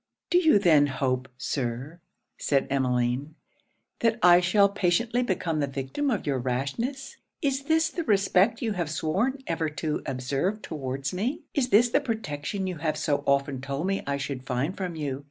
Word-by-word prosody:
'Do 355 Hz, -, +6 dB
you 320 Hz, -, +5 dB
then 155 Hz, -7 st, +5 dB
hope, 130 Hz, -1 st, -1 dB
Sir,' 130 Hz, +5 st, -3 dB, 0.4 s
said 140 Hz, -2 st, +1 dB
Emmeline, 130 Hz, +2 st, 0 dB, 0.6 s
'that 230 Hz, -1 st, +2 dB
I 175 Hz, 0 st, +8 dB
shall 200 Hz, +3 st, +4 dB
patiently 205 Hz, +5 st, +1 dB
become 180 Hz, -8 st, -1 dB
the 140 Hz, -, +1 dB
victim 135 Hz, -, -2 dB
of 220 Hz, -6 st, -1 dB
your 135 Hz, -3 st, 0 dB
rashness? 140 Hz, -, -3 dB, 0.3 s
Is 275 Hz, -1 st, 0 dB
this 320 Hz, +1 st, +3 dB
the 340 Hz, +1 st, -3 dB
respect 200 Hz, +1 st, +3 dB
you 225 Hz, -, 0 dB
have 175 Hz, -6 st, -2 dB
sworn 205 Hz, -, -1 dB
ever 165 Hz, -1 st, -1 dB
to 150 Hz, 0 st, -3 dB
observe 135 Hz, +11 st, -2 dB
towards 135 Hz, -2 st, -4 dB
me? 250 Hz, -, -2 dB
Is 260 Hz, -4 st, +1 dB
this 235 Hz, +2 st, +5 dB
the 235 Hz, -, +2 dB
protection 200 Hz, -, -3 dB
you 180 Hz, -2 st, -3 dB
have 155 Hz, 0 st, -1 dB
so 145 Hz, -2 st, 0 dB
often 140 Hz, -1 st, +1 dB
told 140 Hz, +4 st, -3 dB
me 195 Hz, +1 st, 0 dB
I 140 Hz, 0 st, 0 dB
should 140 Hz, -2 st, -4 dB
find 130 Hz, +7 st, -2 dB
from 180 Hz, -3 st, -4 dB
you? 140 Hz, -4 st, -3 dB
165 Hz, 175 wpm, -27 LUFS, 140-215 Hz, 0.6 s, I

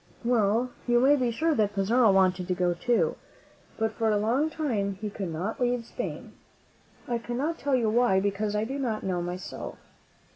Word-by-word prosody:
Well, 235 Hz, +1 st, +2 dB, 0.2 s
you 240 Hz, 0 st, +4 dB
may 275 Hz, +4 st, +5 dB
be 255 Hz, -4 st, +1 dB
sure 315 Hz, +8 st, +1 dB
that 210 Hz, -5 st, +1 dB
Pizarro 220 Hz, +3 st, +4 dB
wanted 185 Hz, -1 st, +2 dB
to 180 Hz, -, 0 dB
go 180 Hz, -1 st, +1 dB
too; 245 Hz, -, +1 dB, 0.6 s
but 220 Hz, -1 st, 0 dB
for 225 Hz, 0 st, 0 dB
a 210 Hz, -, +3 dB
long 245 Hz, +9 st, +1 dB
time 230 Hz, -12 st, -1 dB
he 210 Hz, +2 st, -5 dB
could 195 Hz, -4 st, -4 dB
not 185 Hz, +10 st, -4 dB
leave 245 Hz, -1 st, +1 dB
Spain. -, -, -6 dB, 0.7 s
I 240 Hz, -1 st, -1 dB
cannot 265 Hz, +8 st, -3 dB
tell 280 Hz, -1 st, +1 dB
you 235 Hz, -3 st, +1 dB
why, 225 Hz, -3 st, +3 dB
because 205 Hz, +1 st, -1 dB
I 210 Hz, -, +1 dB
do 270 Hz, +5 st, -4 dB
not 230 Hz, -5 st, -2 dB
know 180 Hz, -2 st, -1 dB
myself. 175 Hz, +1 st, -6 dB
220 Hz, 185 wpm, -27 LUFS, 195-245 Hz, 0.7 s, may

